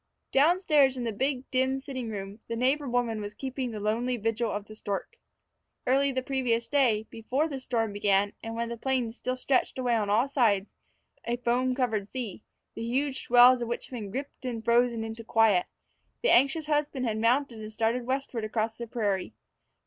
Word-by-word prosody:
Down 320 +7 +4
stairs 285 -7 +4
in 245 - -3
the 230 - -1
big, 265 +4 -2
dim 260 +1 +1
sitting 260 -3 -5
room, 200 0 -6
the 230 - -3
neighbor 265 +4 +1
woman 240 -3 0
was 205 0 -6
keeping 260 0 -4
the 220 -2 -5
lonely 235 +4 0
vigil 225 +1 -1
of 205 0 -4
the 215 - -11
stork. 205 - -4 0.7
Early 275 +2 +3
the 260 -1 -2
previous 245 -4 0
day, 235 -6 +2
before 255 +7 -1
the 275 -4 -5
storm 225 -5 -1
began, 205 0 +2
and 225 0 -6
when 235 0 -2
the 235 - -5
plains 250 -3 -1
still 255 0 -3
stretched 260 0 +1
away 250 -2 +1
on 215 -3 +1
all 225 +6 +3
sides, 220 -8 +1 0.5
a 240 +1 -1
foam 250 +1 +1
covered 220 -6 -1
sea, 235 -7 -5 0.3
the - - -7
huge 265 +4 -1
swells 245 +1 +7
of 235 - -2
which 235 - -4
had 255 - -7
been 210 -4 -5
gripped 270 +7 -6
and 235 -3 -4
frozen 235 -1 +3
into 225 +1 -6
quiet, 220 -5 +3 0.6
the - - +4
anxious 280 +5 +4
husband 295 -3 0
had 220 -2 -1
mounted 240 +1 +1
and 215 0 -7
started 230 +3 0
westward 260 -3 -2
across 220 +1 -2
the 235 - -5
prairie. 205 -5 -2
240 Hz, 195 wpm, -28 LUFS, 220-260 Hz, 0.7 s, swells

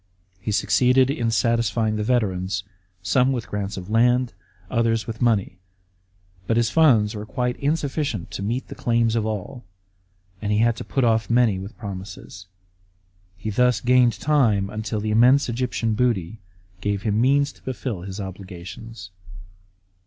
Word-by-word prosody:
He 100 +4 -3
succeeded 125 +5 +3
in 120 -6 -1
satisfying 115 0 +1
the 105 - -1
veterans, 95 -6 0 0.4
some 125 +9 +3
with 120 -4 -3
grants 100 -1 -4
of 90 -1 -7
land, 120 +3 +2 0.3
others 115 0 0
with 115 -1 -7
money; 105 -6 +1 0.9
but 115 - +1
his 120 -1 +2
funds 120 -10 +4
were 105 -1 -5
quite 125 +2 -2
insufficient 140 - -2
to 85 - -5
meet 120 +6 -2
the - - -8
claims 115 -1 +1
of 110 -1 0
all, 110 +4 -5 0.8
and 105 -1 -2
he 105 - +2
had 115 +1 +3
to - - -5
put 135 - -1
off 115 -1 +2
many 115 -5 +3
with 100 +5 -9
promises. 95 -3 -8 0.9
He 110 +2 -4
thus 125 +2 +3
gained 125 -1 +3
time 115 -10 +2
until 110 0 -3
the 105 +1 -2
immense 125 +6 +5
Egyptian 120 -2 -1
booty 110 -4 0 0.4
gave 100 -1 -1
him 105 +1 +1
means 140 +3 +3
to - - -23
fulfil 125 -6 -4
his 95 +2 -7
obligations. 95 +2 -9
115 Hz, 155 wpm, -23 LUFS, 100-125 Hz, 0.9 s, immense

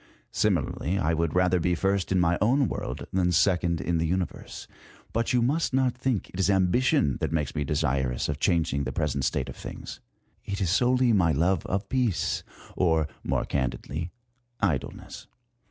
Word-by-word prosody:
Similarly 95 +3 0
I 80 -4 +1
would 80 0 -1
rather 90 0 +3
be 90 +1 +1
first 95 +2 0
in 95 -1 +3
this - - +3
mj 85 - +1
own 130 +5 +3
world - - -4
than 90 -1 +2
second 85 -1 +2
in 85 -1 -1
the 80 - 0
Universe. 90 +1 -4 0.5
But 115 +1 0
you 125 -1 +3
must 140 +2 +1
not 130 -2 +2
think 125 -4 -1
it 90 - -8
is 95 - +2
ambition 95 - +2
that - - -1
makes 75 -4 -1
me 75 - -1
desirous 70 -4 0
of 75 0 -3
changing 80 -6 +1
the 65 - -2
present 70 -1 -1
state 65 - -1
of 70 - -8
things; - - -8 0.4
it 100 -1 -4
is 90 -4 0
solely 125 +3 +3
my 90 -5 +3
love 85 +5 +1
of 100 +2 -2
peace, 125 -7 0 0.3
or, 80 -4 +2 0.2
more - - 0
candidly, 70 +5 -3 0.5
idleness. 80 -10 -3
90 Hz, 175 wpm, -27 LUFS, 80-100 Hz, 0.5 s, rather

